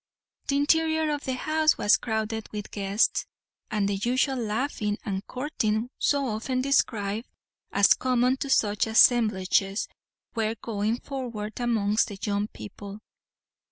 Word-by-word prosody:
The 280 - +1
interior 315 +1 +2
of 290 -1 -3
the 260 - -1
house 310 +3 +2
was 205 - +5
crowded 220 -1 -3
with 210 -1 -6
guests, 200 +1 +1 0.4
and 205 -2 0
the 200 -1 -1
usual 255 +5 +1
laughing 220 -2 -2
and 195 -2 -3
courting 245 -4 -2
so 280 -1 +2
often 245 +2 -2
described, 225 -5 0 0.4
as 200 0 +5
common 255 0 +1
to 275 - -4
such 210 -4 +2
assemblages, 215 -4 +3 0.5
were 225 -1 -1
going 220 +1 -2
forward 235 -6 -5
amongst 220 -3 +1
the 205 - -8
young 205 +1 -1
people. 200 - -9
225 Hz, 130 wpm, -26 LUFS, 205-260 Hz, 0.5 s, was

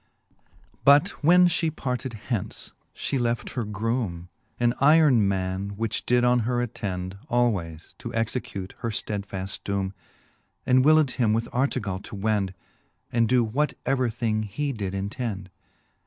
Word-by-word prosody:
XII. - - -35 0.5
But 140 +1 +7 0.2
when 180 +4 +7
fhe 165 -2 0
parted 125 -2 -3
hence, 110 -2 -4 0.2
fhe 135 - -2
left 120 -1 -1
her 125 - -2
groome 105 -4 -2 0.3
An 120 0 +3
yron 150 -3 +6
man, 95 0 -1
which 115 0 -2
did 125 0 +3
on 125 0 +4
her 120 +2 0
attend 95 -5 -4
Alwayes, 95 -10 0
to 120 - -6
execute 110 -4 -3
her 115 - -2
ftedfaft 100 -3 -4
doome. 100 -1 -2 0.7
And 130 0 +4
willed 155 -2 +5
him 115 -4 +1
with 115 +1 0
Artegall 125 -7 0
to - - -8
wend, 100 -2 0 0.6
And 115 -3 +2
doe 125 -1 +4
what 135 +7 0
ever 130 -2 +1
thing 110 -2 -1
he 135 +8 -3
did 100 -4 -4
intend. 100 -1 -4
115 Hz, 145 wpm, -26 LUFS, 100-125 Hz, 0.7 s, But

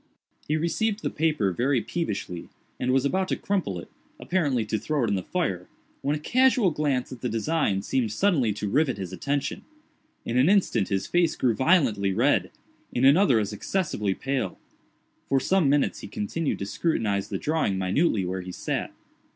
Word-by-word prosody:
He 155 - +1
received 205 +7 -1
the - - -1
paper 150 -11 +1
very 125 +8 +1
peevishly, 105 - -4 0.3
and 125 - 0
was 135 +1 +2
about 185 +6 +1
to - - 0
crumple 185 - -2
it, 85 - -8 0.3
apparently 145 -11 0
to 110 0 -1
throw 150 -4 -1
it 115 - +1
in - - +1
the 95 - 0
fire, 95 - -2 0.3
when 145 +2 0
a - - -4
casual 250 - +3
glance 145 -5 -1
at 130 - -9
the 125 - -1
design 115 -3 0
seemed 115 -1 0
suddenly 135 - +2
to 105 0 -4
rivet 135 +3 +1
his 95 -2 -6
attention. 140 - -2 0.6
In 120 +2 +1
an 135 +7 +5
instant 185 - +2
his 95 -2 -1
face 175 -2 +2
grew 125 -3 +2
violently 115 - +2
red—in 125 +1 -1
another 140 - +5
as 105 -1 -1
excessively 105 - -1
pale. 135 -1 -2 0.7
For 135 - +3
some 180 +1 +2
minutes 145 0 +2
he - - -8
continued 105 +10 -2
to 100 - -4
scrutinize 105 - -1
the - - -2
drawing 150 -11 0
minutely 95 - +1
where 95 +1 -3
he 90 0 -7
sat. - - -3
130 Hz, 175 wpm, -26 LUFS, 105-160 Hz, 0.7 s, an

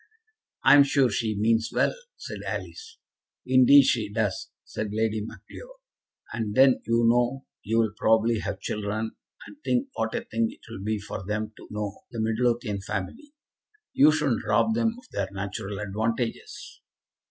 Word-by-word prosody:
"I'm 145 - +8
sure 135 -3 +2
she 110 0 -1
means 115 +2 +2
well," - - +2 0.2
said - - -7
Alice. 450 +1 -6 0.5
"Indeed 130 +2 +7
she 115 -6 0
does," 105 -3 -2
said 105 - -5
Lady 110 0 0
Macleod, - - -11 0.6
"and 110 -3 -3
then 130 -1 +5
you 115 0 +3
know 120 +3 +2 0.2
you'll 110 0 +1
probably 110 +1 +2
have 100 -2 -4
children; 105 +2 -3 0.3
and - - -13
think 250 +2 0
what - - -2
a 240 - -1
thing 230 -1 0
it 270 - -14
will 95 - -8
be 110 +1 -1
for 100 -1 -7
them 110 +2 -3
to - - -14
know 105 -1 -5
the 115 - -7
Midlothian 115 -2 0
family. 110 - -6 0.6
You 150 +2 +6
shouldn't 150 -7 0
rob 110 - +2
them 230 0 +1
of 250 - -15
their 100 -2 -2
natural 100 0 -5
advantages." 110 +4 -4
115 Hz, 155 wpm, -26 LUFS, 105-135 Hz, 0.6 s, I'm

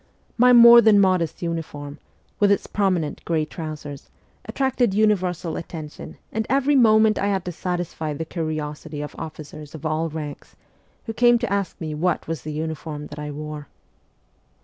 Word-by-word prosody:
My 250 +1 +5
more 235 0 +9
than 220 -3 +5
modest 185 -4 +1
uniform, 150 -3 -5 0.4
with 205 -1 +4
its 200 - +1
prominent 185 -7 -1
grey 160 -2 0
trousers, 150 -3 -8 0.4
attracted 255 -6 0
universal 185 -6 +1
attention, 155 -3 -8
and 220 0 -2
every 275 +2 +2
moment 220 -3 +5
I 200 - 0
had 195 -3 -1
to 180 - -3
satisfy 175 -3 -4
the 160 - -4
curiosity 155 -2 -5
of 150 - -7
officers 155 -1 -9
of 160 - -9
all 155 +1 -1
ranks, 150 -2 -8 0.5
who 225 - -4
came 240 +1 +5
to 235 -4 -2
ask 200 -3 -2
me 155 -2 -4
what 165 +2 -1
was 165 -4 -4
the 155 - -6
uniform 155 -1 -5
that 145 - -9
I 150 0 -5
wore. 150 0 -7
165 Hz, 160 wpm, -23 LUFS, 155-205 Hz, 0.5 s, more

